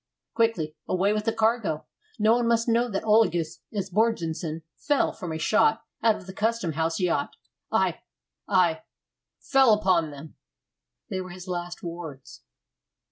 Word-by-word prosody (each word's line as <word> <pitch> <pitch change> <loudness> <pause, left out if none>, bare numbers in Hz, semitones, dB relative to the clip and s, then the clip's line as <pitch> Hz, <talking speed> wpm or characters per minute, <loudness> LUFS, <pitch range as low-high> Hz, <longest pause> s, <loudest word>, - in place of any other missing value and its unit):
"Quickly 225 -10 0
away 195 +3 +2
with 215 0 -2
the 225 - +2
cargo! 220 -7 0 0.3
No 215 0 +4
one 240 -1 +1
must 230 0 +2
know 235 +1 +2
that 195 -3 -2
Olagus 175 -7 +2
Esbjörnsson 180 -6 -1
fell 290 -1 +1
from 180 -5 -6
a 160 - -3
shot 225 +6 +2 0.2
out 225 -2 +4
of - - -10
the 190 - -9
Custom 220 -3 0
house 165 +1 -1
yacht. 180 -3 0 0.4
I - - +1 0.5
I 180 -4 +3 0.6
fell 265 -4 +4
upon 185 -6 +2
them." 145 +1 -11 0.7
They 190 -1 -2
were 185 - -8
his 180 +1 -10
last 175 -1 -5
words. 165 -6 -8
190 Hz, 145 wpm, -26 LUFS, 165-225 Hz, 0.7 s, No